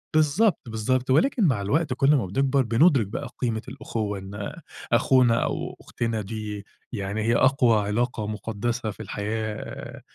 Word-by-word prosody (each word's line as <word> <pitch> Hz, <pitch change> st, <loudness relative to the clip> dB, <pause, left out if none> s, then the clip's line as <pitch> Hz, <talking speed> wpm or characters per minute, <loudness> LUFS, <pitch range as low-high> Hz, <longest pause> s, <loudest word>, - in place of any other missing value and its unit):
بالضبط، 155 Hz, +6 st, +3 dB
بالضبط 125 Hz, +4 st, -1 dB
ولكن 245 Hz, -, +3 dB
مع 130 Hz, -, +2 dB
الوقت 140 Hz, +8 st, 0 dB
كلّ 135 Hz, +3 st, +4 dB
ما 130 Hz, -, +1 dB
بنكبَر 135 Hz, +8 st, +1 dB
بنُدرك 120 Hz, -, +4 dB
بقى 105 Hz, -, -5 dB
قيمة 115 Hz, -3 st, -1 dB
الإخوّة 105 Hz, -3 st, -4 dB
إن 100 Hz, +1 st, -6 dB, 0.4 s
أخونا 125 Hz, -3 st, +4 dB
أو -, -, -3 dB
أختنا 115 Hz, -2 st, -3 dB
دي 105 Hz, 0 st, -6 dB, 0.3 s
يعني 100 Hz, +2 st, -3 dB
هي 115 Hz, +2 st, +2 dB
أقوى 130 Hz, -4 st, +4 dB
علاقة 115 Hz, 0 st, -1 dB
مقدّسة 110 Hz, +2 st, -3 dB
في -, -, -15 dB
الحياة 110 Hz, +1 st, -5 dB
115 Hz, 140 wpm, -25 LUFS, 105-135 Hz, 0.4 s, كلّ